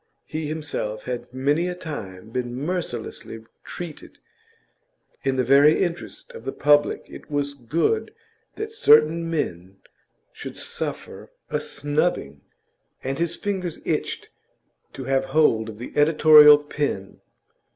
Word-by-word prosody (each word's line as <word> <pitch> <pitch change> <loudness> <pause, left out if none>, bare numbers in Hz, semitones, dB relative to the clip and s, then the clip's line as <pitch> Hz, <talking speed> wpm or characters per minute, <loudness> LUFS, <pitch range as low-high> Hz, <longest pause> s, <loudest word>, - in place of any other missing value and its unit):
He 155 -1 -4
himself 145 -9 -4
had 125 -1 -5
many 145 +7 +1
a 180 - -3
time 110 - -8
been 120 0 -3
mercilessly 125 -7 -5 0.2
treated; 170 -4 -9 1.1
in 135 -1 +1
the 130 - +1
very 140 +5 +5
interest 175 - -5
of 470 - -11
the - - -3
public 145 0 +2
it - - -12
was 145 -1 -1
good 155 - -1 0.4
that 435 +1 -5
certain 165 - +4
men 95 - -3 0.6
should - - -8
suffer - - -5 0.2
a - - 0
snubbing, 145 - -2 0.6
and 135 +2 -3
his 170 0 0
fingers 185 -5 -3
itched - - -2 0.6
to - - -7
have 135 0 +1
hold 135 -6 +2
of 105 - -9
the 120 - -8
editorial 150 0 +8
pen. 145 -9 -4
145 Hz, 125 wpm, -23 LUFS, 125-160 Hz, 1.1 s, editorial